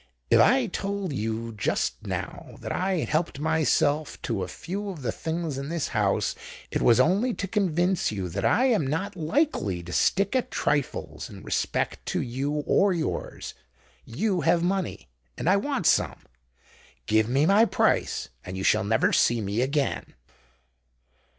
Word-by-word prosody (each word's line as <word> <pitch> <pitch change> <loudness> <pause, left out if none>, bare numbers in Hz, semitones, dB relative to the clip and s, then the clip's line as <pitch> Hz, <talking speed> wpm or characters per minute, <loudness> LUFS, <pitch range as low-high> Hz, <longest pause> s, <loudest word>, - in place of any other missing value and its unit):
"If - - +6
I 260 0 +5
told 200 -3 -3
you 115 -1 -3
just 105 - -2
now - - -5
that - - -5
I 190 +1 0
had 165 - -2
helped 155 -1 0
myself 155 -1 +1
to 115 -5 -2
a 90 - -2
few 200 - -5
of 165 -8 -7
the 115 - 0
things 160 -2 -3
in 140 +1 -5
this 165 -3 -2
house, 105 -5 +1 0.4
it - - -1
was 120 0 +5
only 200 - +3
to 195 - -3
convince 185 -3 +1
you 95 -3 -3
that 100 +4 -4
I 250 - +3
am 215 - +2
not 160 +9 -2
likely 155 - 0
to 90 +1 -8
stick 200 +5 +2
at 255 - 0
trifles 145 -3 -2
in - - -11
respect - - -1
to - - -1
you 140 +5 -2
or 195 -1 +3
yours. 165 -3 -4 0.5
You 185 - -1
have 165 +3 +3
money—and 60 - -4
I 190 +3 +5
want 255 - -2
some. - - +3 0.9
Give 110 +1 +2
me 135 +4 +3
my 200 +5 +5
price—and 65 - -1
you 95 - -3
shall 110 +1 +3
never 110 +2 +2
see 120 0 +3
me 105 +2 -1
again." 140 +2 -1
155 Hz, 160 wpm, -26 LUFS, 115-190 Hz, 0.9 s, If